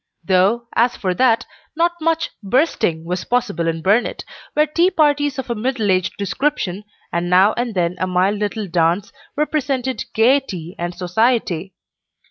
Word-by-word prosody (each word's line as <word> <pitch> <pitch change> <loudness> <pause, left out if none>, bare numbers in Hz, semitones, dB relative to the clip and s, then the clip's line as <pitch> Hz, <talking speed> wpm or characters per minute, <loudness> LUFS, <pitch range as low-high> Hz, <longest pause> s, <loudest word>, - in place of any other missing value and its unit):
Though, 195 +6 +2
as 240 +2 +2
for 185 -2 -1
that, 230 +2 +2 0.3
not 340 +2 +2
much 330 0 0
"bursting" 210 - 0
was 180 +1 -3
possible 215 -9 -1
in 165 -1 -2
Burnet, 210 +6 +1 0.3
where 300 0 +4
tea 335 +4 +2
parties 290 -4 +2
of 265 -2 -4
a - - +2
middle 230 -2 -1
aged 185 -1 +1
description, 205 -2 -2 0.3
and 170 +1 -1
now 190 +4 +5
and 240 -3 -3
then 175 0 0
a 185 - 0
mild 185 +3 +1
little 210 +1 -2
dance, 170 +3 0 0.2
represented 275 -5 -1
"gayety" 220 - +1
and 175 +1 -3
"society." 190 -2 0
210 Hz, 150 wpm, -19 LUFS, 180-260 Hz, 0.3 s, now